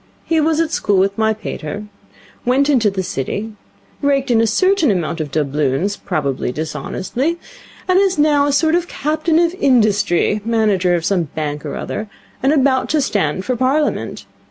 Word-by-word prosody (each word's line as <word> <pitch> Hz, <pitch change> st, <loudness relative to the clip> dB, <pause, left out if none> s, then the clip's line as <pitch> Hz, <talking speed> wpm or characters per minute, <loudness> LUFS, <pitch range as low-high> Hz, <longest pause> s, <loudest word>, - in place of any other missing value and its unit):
He 325 Hz, -1 st, +2 dB
was 315 Hz, +1 st, +1 dB
at 330 Hz, -1 st, 0 dB
school 205 Hz, -9 st, +1 dB
with 195 Hz, +1 st, +2 dB
my 220 Hz, -1 st, +2 dB
pater, 210 Hz, -3 st, -5 dB, 0.6 s
went 275 Hz, +4 st, +2 dB
into 230 Hz, -6 st, +3 dB
the 190 Hz, -1 st, -3 dB
City, 200 Hz, +9 st, -4 dB, 0.5 s
raked 275 Hz, -2 st, +1 dB
in 225 Hz, -1 st, +4 dB
a 225 Hz, -, +2 dB
certain 370 Hz, -, +2 dB
amount 170 Hz, -4 st, -1 dB
of 150 Hz, -, -4 dB
doubloons 150 Hz, +5 st, 0 dB
probably 140 Hz, -11 st, -2 dB
dishonestly 160 Hz, -, -3 dB, 0.5 s
and 370 Hz, 0 st, +4 dB
is 390 Hz, -2 st, +2 dB
now 295 Hz, -1 st, +3 dB
a -, -, +1 dB
sort 315 Hz, +3 st, +2 dB
of 350 Hz, 0 st, +1 dB
Captain 310 Hz, +2 st, 0 dB
of 340 Hz, 0 st, +2 dB
Industry, 210 Hz, -, +2 dB
manager 210 Hz, -6 st, +2 dB
of 170 Hz, -1 st, -2 dB
some 185 Hz, -4 st, +1 dB
bank 150 Hz, -1 st, -3 dB
or -, -, -5 dB
other, 215 Hz, 0 st, -5 dB, 0.3 s
and 270 Hz, -, +3 dB
about 270 Hz, -3 st, +2 dB
to 310 Hz, -, +2 dB
stand 190 Hz, -, -1 dB
for 255 Hz, -, 0 dB
Parliament. 270 Hz, +5 st, -1 dB
225 Hz, 170 wpm, -18 LUFS, 180-295 Hz, 0.6 s, in